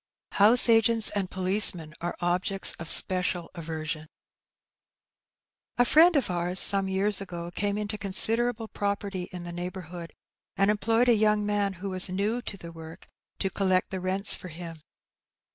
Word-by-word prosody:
House 220 +6 +5
agents 225 -1 +2
and 200 -3 -4
policemen 185 -4 +1
are 175 +1 -4
objects 180 +2 +2
of 165 0 -7
special 180 -2 +3
aversion. 155 -1 -7 1.7
A 245 - +3
friend 330 +6 +4
of 270 -9 0
ours, 175 +1 +2
some 195 -1 +2
years 195 +2 -1
ago, 175 -3 -8
caiue 205 0 -2
into 210 0 -5
considerable 225 +4 +1
property 200 -3 -5
in 180 -1 -8
the 175 - -7
neighbourhood, 175 -1 -8 0.5
and 195 +1 +2
employed 225 +3 0
a 240 - +5
young 210 -1 +1
man 205 -1 -1
who 190 +2 -7
was 185 0 +2
new 205 +6 -2
to 205 - -7
the 170 -2 -11
work 165 0 -13 0.3
to 195 - -3
collect 185 -1 -1
the 190 - -4
rents 190 +2 +3
for - - -6
him. 165 -1 -10
190 Hz, 155 wpm, -26 LUFS, 175-210 Hz, 1.7 s, House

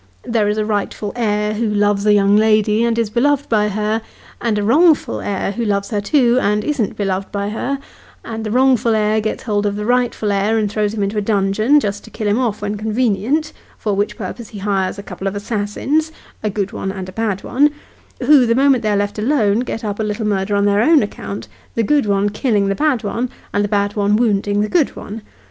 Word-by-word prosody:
There 225 -3 0
is 210 - -1
a 215 - 0
rightful 205 -1 -2
heir, 210 -2 0
who 220 +1 -1
loves 205 0 +1
a - - +6
young 200 0 +4
lady, 215 0 +3
and 235 -1 +1
is 230 -3 0
beloved 285 +4 +1
by 210 -2 +2
her; 215 +2 -1 0.4
and 225 -3 0
a 205 - 0
wrongful 305 +8 +3
heir, 195 -1 -2
who 235 +4 -3
loves 200 -1 -1
her 205 -2 0
too, 245 +2 +3
and 210 +1 +1
isn't 275 -9 -1
beloved 195 -1 -2
by 200 0 -2
her; 255 +6 -2 0.5
and 225 -1 -5
the 215 - -3
wrongful 250 -1 +3
heir 215 0 +1
gets 215 - -3
hold 205 -2 0
of 200 - -2
the 210 0 -4
rightful 245 -3 +1
heir, 200 +3 +1
and 210 -2 0
throws 210 0 -1
him 205 - -1
into 205 +2 -1
a - - -1
dungeon, 210 +6 +2
just 205 -5 -3
to - - -12
kill 215 - -4
him 205 +4 +2
off 220 -5 -1
when 205 0 -2
convenient, 235 +7 0 0.2
for 210 - -2
which 205 +1 -1
purpose 220 +2 -7
he 215 - -9
hires 195 -1 -1
a 200 - -7
couple 190 0 -6
of 195 - -3
assassins 220 +9 -1 0.3
a 215 - -1
good 200 -1 -2
one 195 - -4
and 190 -1 -6
a - - -8
bad 210 -1 -2
one 285 +4 +3 0.5
who, 265 -2 +6
the 230 - +2
moment 270 -1 +4
they 215 - -1
are 205 - +2
left 205 +1 -2
alone, 220 -3 +2
get 235 -2 -4
up 205 -1 -3
a - - 0
little 210 +1 -2
murder 205 -1 0
on 200 0 +2
their 205 +1 +3
own 305 +1 +5
account, 200 -1 -6 0.3
the 230 - +1
good 285 +1 +2
one 200 0 +2
killing 205 -2 0
the - - +2
bad 290 0 0
one, 235 +4 -2 0.2
and 205 - +1
the - - 0
bad 205 0 0
one 205 0 +2
wounding 205 -2 +1
the 210 - 0
good 320 +2 +1
one. 220 +2 -8
210 Hz, 230 wpm, -18 LUFS, 205-235 Hz, 0.5 s, a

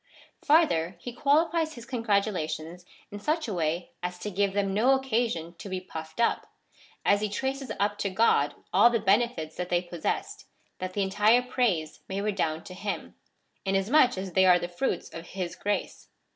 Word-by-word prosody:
Farther, 280 - +3
he 245 +6 -7
qualifies 315 +5 +2
his 235 -1 -10
congratulations 195 -8 -1 0.3
in 205 - -6
such 310 +7 -1
a 215 - -3
way 170 0 -1
as 180 0 -4
to 210 +3 -5
give 200 +1 +1
them 195 -1 0
no 245 +7 +4
occasion 230 -10 -1
to 200 - -7
be 185 0 -2
puffed 160 -1 -9
up, 235 - +1 0.6
as 205 0 +4
he 210 - 0
traces 265 +3 -3
up 205 0 0
to 200 - 0
God 185 -8 +2 0.2
all 205 +5 +7
the 235 -1 +1
benefits 200 -6 +1
that 180 0 -3
they 175 - +3
possessed, 180 - -4 0.3
that 185 0 -4
the 200 - 0
entire 210 +5 +4
praise 210 -12 0
may 195 +1 -2
redound 190 -6 -1
to 185 - -9
him, 200 +2 -4 0.5
inasmuch 200 +7 +3
as 190 -1 -5
they 190 +1 +5
are 180 -1 +7
the 175 - -3
fruits 175 +2 -2
of 165 +1 -8
his 175 -2 -3
grace. 205 0 -3
200 Hz, 175 wpm, -28 LUFS, 180-240 Hz, 0.6 s, all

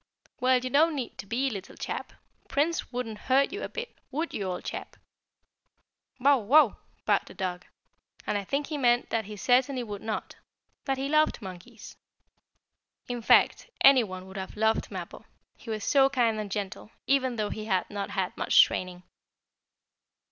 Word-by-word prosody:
"Well, 255 0 +4
you 255 0 -4
don't 310 +3 +4
need 255 -4 -5
to 200 - -7
be, 255 +5 0
little 195 -3 -7
chap. - - -5 0.3
Prince 310 +2 0
wouldn't 235 -4 -4
hurt 270 +2 +4
you 405 - -4
a - - -4
bit, 475 0 -6
would 310 +5 -3
you, 200 - -3
old 180 -1 -4
chap?" - - -6 1.2
"Bow 275 +1 +5
wow!" 255 +3 +5 0.3
barked - - +2
the - - -12
dog, 180 -2 -4 0.6
and - - -1
I 200 - -1
think 280 +8 -1
he 300 -1 -4
meant 240 -2 +2
that 225 -2 0
he 210 +1 -8
certainly 250 +3 +2
would 205 -3 -7
not 220 -1 -4 0.5
that 270 -1 0
he 270 +1 -2
loved 305 +1 +2
monkeys. 200 +3 -10 1.1
In 245 -1 -3
fact, 230 - +4
any 270 -3 +7
one 185 -3 -7
would 190 +1 -10
have 190 +2 -6
loved 220 +1 +1
Mappo, - - -7 0.3
he 235 - -13
was 215 -2 -3
so 270 -1 +4
kind 235 -5 +1
and 210 -1 -4
gentle, 200 0 -5 0.2
even 260 -2 +2
though 215 -2 -2
he 215 - -5
had 190 -4 0
not 200 0 -4
had 195 -2 -2
much - - +6
training. 180 -1 -4
235 Hz, 175 wpm, -28 LUFS, 200-270 Hz, 1.2 s, any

